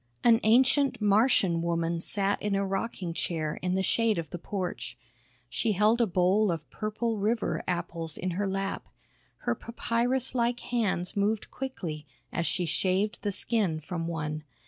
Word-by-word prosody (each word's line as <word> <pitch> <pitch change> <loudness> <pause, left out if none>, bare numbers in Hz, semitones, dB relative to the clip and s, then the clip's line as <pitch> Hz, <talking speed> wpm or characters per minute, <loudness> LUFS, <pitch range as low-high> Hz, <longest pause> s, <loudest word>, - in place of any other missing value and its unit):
An 230 -1 +6
ancient 255 +3 +4
Martian 205 -5 +3
woman 170 0 0
sat 200 +2 0
in 205 -1 0
a 195 0 +1
rocking 195 -3 -3
chair 160 -2 -2
in 180 0 0
the 190 - +1
shade 225 +2 +2
of 165 -3 -4
the 175 - -5
porch. 180 - -4 0.5
She 215 - 0
held 215 +5 +3
a 235 - +4
bowl 190 +3 +3
of 160 -3 -4
purple 215 +1 -2
river 215 +3 0
apples 170 -3 -2
in 185 - -2
her 195 +4 -1
lap. 195 0 -3 0.6
Her - - +2
papyrus 240 +2 -1
like 240 0 +1
hands 205 -7 0
moved 205 +1 0
quickly 170 - -5 0.3
as 170 - 0
she 180 -1 0
shaved 190 +5 0
the 205 - -1
skin 195 -6 +1
from 165 +2 -4
one. 155 -2 -3
195 Hz, 160 wpm, -29 LUFS, 170-225 Hz, 0.6 s, An